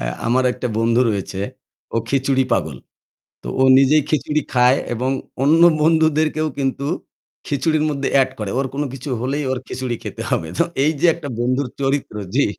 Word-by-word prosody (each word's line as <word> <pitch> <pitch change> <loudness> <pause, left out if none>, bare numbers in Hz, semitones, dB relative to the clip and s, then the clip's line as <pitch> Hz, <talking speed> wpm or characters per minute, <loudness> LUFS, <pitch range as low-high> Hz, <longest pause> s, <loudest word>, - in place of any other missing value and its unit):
আ - - -3 0.2
আমার 125 +2 +2
একটা 125 - -4
বন্ধু 115 +1 +2
রয়েছে। 100 -2 -3 0.5
ও - - +1
খিচুড়ি 135 0 +1
পাগল। 75 - 0 0.7
তো - - -7
ও - - +6
নিজেই 140 +3 +5
খিচুড়ি 155 0 0
খায় 125 +2 +5 0.2
এবং 125 +3 -1 0.3
অন্য 160 +4 +4 0.2
বন্ধুদেরকেও 155 -1 +2
কিন্তু 135 0 -1 0.6
খিচুড়ির 155 +2 +1
মধ্যে 140 -2 -2
এড 130 - +1
করে। 105 -2 -3
ওর 135 - 0
কোন 145 +2 -1
কিছু 135 +2 -7
হলেই 140 +4 -1
ওর 130 - -1
খিচুড়ি 130 -2 -3
খেতে - - -6
হবে। 80 - -1
তো - - +4 0.2
এই 150 - +3
যে 170 - +2
একটা 165 -4 -8
বন্ধুর 130 +2 0
চরিত্র, 135 -4 -1 0.2
জ্বি। 140 - +4
135 Hz, 170 wpm, -20 LUFS, 125-150 Hz, 0.7 s, ও